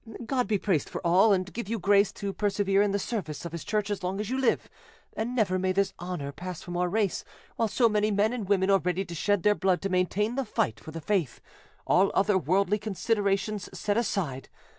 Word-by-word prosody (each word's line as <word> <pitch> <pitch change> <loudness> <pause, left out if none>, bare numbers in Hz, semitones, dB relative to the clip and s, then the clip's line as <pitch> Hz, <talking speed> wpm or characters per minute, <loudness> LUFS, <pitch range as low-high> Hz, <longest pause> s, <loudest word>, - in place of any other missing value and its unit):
God 250 +1 0
be 215 - +2
praised 185 -7 0
for - - -5
all, 185 +6 +5
and 190 -1 0
give 235 -3 -5
you 230 - -1
grace 200 +1 +3
to 200 -1 -4
persevere 200 -1 +1
in 205 - +3
the 200 - 0
service 190 -7 -4
of 170 - -5
His 170 -1 -6
Church 210 -1 -1
as 200 -1 -2
long 185 +2 -2
as 210 +2 -3
you 260 - 0
live, 265 - +1 0.5
and 235 +3 -3
never 190 -6 +1
may 185 0 +1
this 195 0 +1
honour 175 -5 -4
pass 180 +3 -7
from 175 -1 -6
our 180 0 +1
race, 205 -1 0 0.3
while 225 - +1
so 225 +4 +3
many 210 -1 +1
men 210 +3 +2
and 220 -6 -4
women 195 -1 +3
are 195 - +5
ready 180 +2 -1
to 170 - -8
shed 205 +3 0
their 210 - +5
blood 190 -3 +1
to 195 - -1
maintain 185 +4 +1
the 270 +1 -1
fight 160 - -1
for - - -11
the 165 +1 -7
faith, 175 - -1 0.5
all 190 +2 +4
other 200 +1 +3
worldly 190 +5 +2
considerations 205 -1 -1
set 205 - 0
aside. 180 - -2
195 Hz, 225 wpm, -28 LUFS, 180-210 Hz, 0.5 s, all